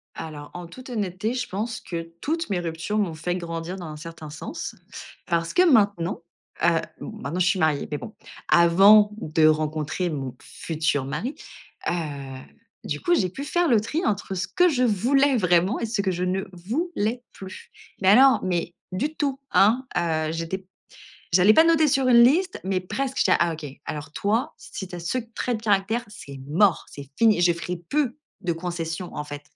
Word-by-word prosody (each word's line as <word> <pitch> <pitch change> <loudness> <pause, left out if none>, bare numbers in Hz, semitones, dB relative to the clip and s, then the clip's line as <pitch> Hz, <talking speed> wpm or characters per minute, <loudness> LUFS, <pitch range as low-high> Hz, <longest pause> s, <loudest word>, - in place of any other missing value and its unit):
Alors, 150 -2 -8
en 175 -1 -7
toute 255 +10 -12
honnêteté, 210 -1 -2
je 250 -1 -3
pense 220 +4 -3
que 165 -1 -6
toutes 325 +2 -2
mes 190 -3 0
ruptures 170 +5 -3
m'ont 200 -6 0
fait 165 +3 -3
grandir 170 +1 -5
dans 180 - -7
un 155 - -7
certain 160 0 -9
sens 150 - -6 0.5
parce 170 -2 -1
que - - +4
maintenant, 205 - +3 0.4
heu, - - +5 0.3
m - - -6
maintenant 160 +6 -3
je 180 - +3
suis 190 0 +2
mariée 155 -3 +1
mais 150 - -2
bon, 210 - -9 0.4
avant 195 +5 +7
de 155 -5 +2
rencontrer 155 +3 0
mon 135 -5 -4
futur 155 -4 -2
mari. 175 - -4 0.5
Heu, - - 0 0.9
du - - -3
coup 350 -1 +2
j'ai 185 - +1
pu 270 +10 -7
faire 350 +3 +1
le 235 -4 +5
tri 305 - -2
entre 200 -2 -1
ce 180 - -2
que 360 0 +3
je 270 -7 +1
voulais 255 +5 +3
vraiment 180 +2 +2
et - - -1
ce 220 -2 -1
que 190 -2 0
je 180 0 -2
ne 190 +1 -1
voulais 235 - -2
plus, 190 -1 -11 0.3
mais 190 - +4
alors 260 +6 +7
mais 175 -2 -1 0.2
du 285 +12 -2
tout 275 -3 -1
hein, 230 +6 +4
heu, 160 -2 0
j'étais 165 +3 -3
p 190 - -25 0.7
j'allais 185 +4 +6
pas 320 - +7
noter 330 -2 +4
sur 270 -2 +2
une 235 -1 +7
liste 345 +9 +3
mais 190 -1 0
presque. 265 +8 -3
J'étais - - +3
là: - - +5
«ah 170 -1 +2
OK! 160 -1 -7 0.2
Alors 150 -1 -6
toi 225 - -1
si 190 - -8
tu 180 - -8
as - - -6
ce 170 +9 -2 0.2
trait 245 - -1
de 220 - -7
caractère, 210 +3 +1
c'est 140 -10 -10
mort, 180 +4 +3
c'est 140 -1 -10
fini. 220 -5 +4
Je 175 0 +4
ferai 175 +1 -5
plus 250 - -1 0.3
de 180 -3 -1
concessions 170 0 -4
en 150 - -3
fait, 145 -1 -8
185 Hz, 195 wpm, -24 LUFS, 165-235 Hz, 0.9 s, avant